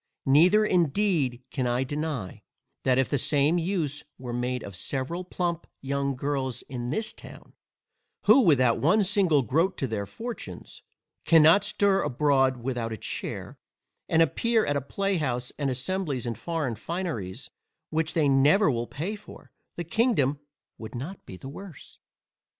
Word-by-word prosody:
Neither 180 Hz, +10 st, +5 dB
indeed 165 Hz, -, +1 dB
can 130 Hz, -2 st, -1 dB
I 120 Hz, +2 st, +1 dB
deny, 145 Hz, -7 st, -4 dB, 0.4 s
that 130 Hz, -1 st, +3 dB
if 130 Hz, -, +3 dB
the 145 Hz, -, 0 dB
same 150 Hz, +5 st, +2 dB
use 160 Hz, -5 st, -2 dB
were 125 Hz, -2 st, -6 dB
made 125 Hz, +1 st, -2 dB
of 100 Hz, -, -8 dB
several 135 Hz, -, -3 dB
plump 175 Hz, -2 st, -3 dB
young 140 Hz, 0 st, -1 dB
girls 130 Hz, -2 st, -2 dB
in 120 Hz, -2 st, -5 dB
this 215 Hz, -, -2 dB
town, -, -, -13 dB, 0.7 s
who 220 Hz, +7 st, +7 dB
without 130 Hz, -, +4 dB
one 195 Hz, +9 st, +4 dB
single 185 Hz, -8 st, +3 dB
groat 160 Hz, -, +1 dB
to -, -, -1 dB
their 105 Hz, -5 st, -3 dB
fortunes, 220 Hz, -, -8 dB, 0.4 s
cannot 165 Hz, +4 st, +6 dB
stir 200 Hz, -1 st, +2 dB
abroad 135 Hz, -2 st, +2 dB
without 120 Hz, -3 st, -2 dB
a 110 Hz, -, -4 dB
chair, -, -, -5 dB, 0.5 s
and 165 Hz, 0 st, +5 dB
appear 225 Hz, -, +1 dB
at 145 Hz, -, 0 dB
a 140 Hz, -, 0 dB
playhouse 145 Hz, -8 st, -2 dB
and 140 Hz, -2 st, 0 dB
assemblies 135 Hz, 0 st, -2 dB
in 120 Hz, -, -2 dB
foreign 160 Hz, -3 st, -3 dB
fineries 115 Hz, -, -5 dB, 0.4 s
which 160 Hz, 0 st, -1 dB
they 155 Hz, -3 st, +3 dB
never 145 Hz, +7 st, +4 dB
will 120 Hz, -1 st, -2 dB
pay 180 Hz, +9 st, -4 dB
for, 210 Hz, 0 st, -14 dB, 0.2 s
the 175 Hz, -, -4 dB
kingdom 170 Hz, -, +1 dB, 0.4 s
would 110 Hz, +2 st, -8 dB
not 155 Hz, +11 st, -7 dB
be 95 Hz, -, -9 dB
the 135 Hz, -, -10 dB
worse. 165 Hz, +3 st, -11 dB
145 Hz, 150 wpm, -27 LUFS, 130-180 Hz, 0.7 s, who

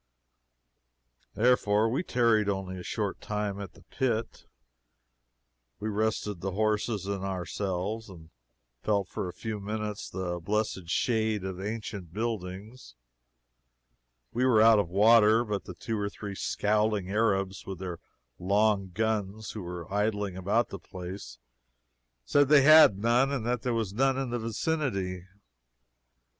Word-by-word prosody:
Therefore 110 Hz, -2 st, +3 dB
we 125 Hz, +8 st, 0 dB
tarried 115 Hz, -, +2 dB
only 95 Hz, -2 st, -3 dB
a -, -, -8 dB
short 105 Hz, -1 st, -3 dB
time 105 Hz, -1 st, -3 dB
at 95 Hz, -3 st, -8 dB
the -, -, -18 dB
pit. 115 Hz, -4 st, -2 dB, 1.3 s
We 110 Hz, +2 st, -3 dB
rested 105 Hz, -3 st, -1 dB
the 95 Hz, +1 st, -3 dB
horses 105 Hz, 0 st, 0 dB
and 100 Hz, -1 st, -3 dB
ourselves, 95 Hz, +3 st, -3 dB
and 80 Hz, -4 st, -13 dB, 0.5 s
felt 100 Hz, +1 st, 0 dB
for 95 Hz, -, -4 dB
a -, -, -4 dB
few 110 Hz, +2 st, -5 dB
minutes 105 Hz, 0 st, -4 dB
the 90 Hz, -1 st, -3 dB
blessed 100 Hz, -1 st, -2 dB
shade 110 Hz, -1 st, +1 dB
of 95 Hz, -1 st, -4 dB
the 95 Hz, +2 st, -4 dB
ancient 105 Hz, -5 st, -6 dB
buildings. 105 Hz, -, -5 dB, 1.4 s
We 125 Hz, -, 0 dB
were 125 Hz, -4 st, +5 dB
out 110 Hz, -1 st, +7 dB
of 100 Hz, -, -1 dB
water, 110 Hz, +3 st, +5 dB
but 105 Hz, -2 st, -3 dB
the -, -, -8 dB
two 110 Hz, -2 st, -3 dB
or 100 Hz, 0 st, -1 dB
three 100 Hz, -1 st, -7 dB
scowling 105 Hz, -1 st, 0 dB
Arabs, 95 Hz, -3 st, 0 dB
with 95 Hz, -1 st, -5 dB
their 90 Hz, -2 st, -6 dB, 0.4 s
long 100 Hz, +1 st, +2 dB
guns, 105 Hz, +1 st, -2 dB
who 110 Hz, -, -6 dB
were 90 Hz, -1 st, -6 dB
idling 105 Hz, -2 st, 0 dB
about 100 Hz, +6 st, +1 dB
the 100 Hz, -, -7 dB
place, 90 Hz, +2 st, -8 dB, 0.9 s
said 145 Hz, -, +3 dB
they 150 Hz, -2 st, +7 dB
had 155 Hz, -9 st, +8 dB
none 120 Hz, +6 st, +2 dB
and 130 Hz, -5 st, -2 dB
that 120 Hz, 0 st, 0 dB
there 125 Hz, -2 st, -1 dB
was 110 Hz, -4 st, -2 dB
none 135 Hz, +3 st, +2 dB
in 135 Hz, -3 st, -2 dB
the 120 Hz, -, -1 dB
vicinity. 110 Hz, -, -2 dB
105 Hz, 145 wpm, -29 LUFS, 95-115 Hz, 1.4 s, had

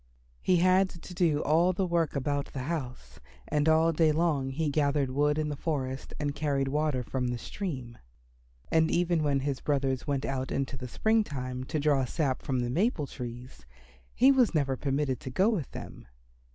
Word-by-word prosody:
He 185 Hz, -, +3 dB
had 185 Hz, +2 st, +4 dB
to 180 Hz, +1 st, -11 dB
do 165 Hz, -4 st, +1 dB
all 170 Hz, +5 st, +3 dB
the 190 Hz, +1 st, 0 dB
work 170 Hz, -4 st, 0 dB
about 140 Hz, +1 st, -2 dB
the 130 Hz, -, -4 dB
house, 125 Hz, -, -5 dB, 0.3 s
and 150 Hz, +1 st, +1 dB
all 160 Hz, +1 st, +4 dB
day 160 Hz, 0 st, +4 dB
long 150 Hz, -4 st, +1 dB
he 150 Hz, +4 st, -1 dB
gathered 140 Hz, -2 st, +1 dB
wood 145 Hz, +2 st, +2 dB
in 155 Hz, -1 st, -1 dB
the 145 Hz, -, -3 dB
forest 135 Hz, -3 st, -3 dB
and 145 Hz, -1 st, -1 dB
carried 140 Hz, -2 st, 0 dB
water 150 Hz, -3 st, 0 dB
from 125 Hz, +1 st, -2 dB
the 120 Hz, 0 st, -2 dB
stream. 130 Hz, -, -6 dB, 0.7 s
And 160 Hz, 0 st, +4 dB
even 175 Hz, -2 st, +1 dB
when 140 Hz, -2 st, +1 dB
his 135 Hz, -2 st, -2 dB
brothers 135 Hz, -2 st, -1 dB
went 140 Hz, -1 st, -1 dB
out 130 Hz, -1 st, -3 dB
in 135 Hz, -, +1 dB
the 130 Hz, -1 st, -7 dB
spring 220 Hz, -, +2 dB
time 130 Hz, -6 st, -5 dB
to 155 Hz, +3 st, -2 dB
draw 145 Hz, -2 st, +2 dB
sap 135 Hz, 0 st, -1 dB
from 130 Hz, -2 st, -1 dB
the 120 Hz, -, -2 dB
maple 180 Hz, -, +1 dB
trees 120 Hz, -, -8 dB, 0.5 s
he 260 Hz, +3 st, +6 dB
was 250 Hz, -9 st, +3 dB
never 135 Hz, -3 st, +1 dB
permitted 135 Hz, -1 st, -1 dB
to -, -, -7 dB
go 190 Hz, -, +3 dB
with 170 Hz, -, -2 dB
them. -, -, -9 dB
145 Hz, 190 wpm, -29 LUFS, 130-165 Hz, 0.7 s, he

